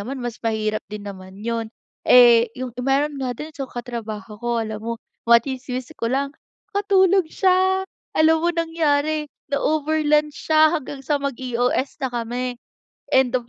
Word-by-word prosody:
naman 255 +7 -5
mas 240 -1 -5
mahirap 215 -1 -1
din 210 -1 -7
naman 190 -1 -9
'yon. 230 -1 -2 0.4
Eh, 240 -2 +7
'yong 255 -2 -5
meron 275 +2 0
nga 250 -2 -2
din, 310 +1 -7
so 275 -5 -6
katrabaho 225 -3 -7
ko 240 0 -2
alam 215 -1 -5
mo, 230 +1 -3 0.4
matsismis 255 +2 +1
ko 230 -7 -3
lang, 275 +3 -1 0.4
nakatulog 390 -3 +3
siya, 375 +1 +2 0.3
alam 320 +1 +4
mo 340 - +1
nangyari, 310 -3 0 0.2
na-over 310 +2 +1
lunch 300 0 +3 0.2
siya 315 0 +6
hanggang 270 0 -9
sa 290 +1 0
mag-EOS 255 0 -1
na 265 - 0
kami, 245 +1 -3 0.5
end 260 -2 +3
of 245 -2 -1
265 Hz, 150 wpm, -22 LUFS, 235-310 Hz, 0.5 s, Eh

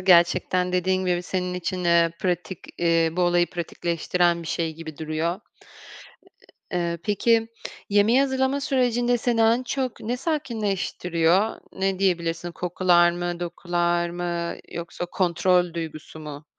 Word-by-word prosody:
gerçekten, 180 0 +3
dediğin 185 +1 +1
gibi, 175 0 +1
senin 180 0 -2
için, 180 0 -3
eee, 170 -1 +4
pratik, 180 -1 -2 0.2
eee, 165 -1 +3
bu 180 +1 0
olayı 175 0 +3
pratikleştiren 170 0 0
bir - - -9
şey 165 -2 -2
gibi 160 -2 -9
duruyor. 160 +3 -2 1.3
Eee, 170 -1 -1
peki, 225 +2 +2 0.4
yemeği 210 +6 +4
hazırlama 265 0 +1
sürecinde 245 -3 +1
seni 235 -1 0
en 230 +3 +4
çok 255 0 -3
ne 240 +3 -2
sakinleştiriyor? 205 - 0
Ne 190 0 -1
diyebilirsin? 170 -2 0
Kokular 175 -1 +3
mı, 175 0 -4
dokular 175 0 -1
mı 175 -1 -3 0.2
yoksa 170 +1 -5
kontrol 175 -1 +1
duygusu 160 -1 -7
mu? 150 -1 -8
175 Hz, 125 wpm, -24 LUFS, 170-200 Hz, 1.3 s, eee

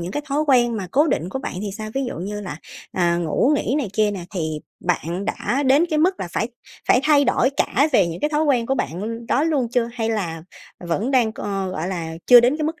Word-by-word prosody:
những 175 +2 -5
cái 295 - -2
thói 285 +2 +1
quen 240 -4 +3
mà 195 -3 -4
cố 295 +4 +3
định 175 - -1
của 265 - -4
bạn 265 - -5
thì 205 - -3
sao, 215 +1 -6
ví 270 0 0
dụ 245 - -4
như 205 +3 -4
là, 175 -7 -6 0.4
ờ, 175 -1 +1
ngủ 175 - +1
nghỉ 270 - -1
này 255 - -2
kia 210 0 +2
nè, 190 -4 -5
thì 155 -3 -2 0.2
bạn 175 +2 -2
đã 270 +6 -1
đến 280 +5 +4
cái 310 - +1
mức 365 +4 +2
là 175 - -3
phải 225 - -1 0.4
phải 250 - +5
thay 290 -2 +5
đổi 250 +1 +2
cả 280 +5 +2
về 190 - +4
những 170 0 -5
cái 300 - 0
thói 300 0 +1
quen 255 -6 +2
của 270 - +1
bạn 220 - -4
đó 275 - +2
luôn 285 -7 +1
chưa, 240 -1 +1
hay 230 -2 -2
là 170 -7 -3 0.4
vẫn 180 +8 -2
đang, 250 -5 +3
ờ, 195 -2 -3
gọi 170 0 -3
là, 170 -4 -4
chưa 245 -1 +9
đến 250 +5 +2
cái 310 - -2
mức 320 +3 -3
230 Hz, 255 wpm, -22 LUFS, 180-270 Hz, 0.4 s, chưa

